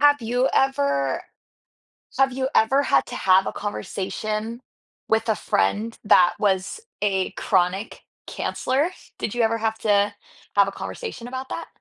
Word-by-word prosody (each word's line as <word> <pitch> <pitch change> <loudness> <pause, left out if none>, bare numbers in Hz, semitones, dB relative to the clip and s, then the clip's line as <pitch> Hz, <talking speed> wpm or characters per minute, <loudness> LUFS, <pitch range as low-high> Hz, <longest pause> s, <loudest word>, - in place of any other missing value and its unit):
Have 290 -2 +5
you 245 +3 +1
ever 140 - +1 1.0
have 270 -1 +3
you 260 +1 -1
ever 270 +6 +4
had - - +3
to - - -6
have 190 0 +4
a - - -3
conversation 215 +3 -4 0.5
with 220 +1 +1
a 215 - +3
friend 205 - 0
that 185 -4 +6
was 195 - 0 0.2
a 195 -2 +1
chronic 190 +2 0 0.3
canceler? 275 +6 -1 0.3
Did 205 - -2
you 240 - +1
ever 225 0 +2
have 220 0 -1
to 205 -1 +2 0.4
have 200 -1 +5
a - - -3
conversation 245 - -6
about 260 +1 -6
that? 335 - -5
220 Hz, 145 wpm, -23 LUFS, 195-255 Hz, 1.0 s, that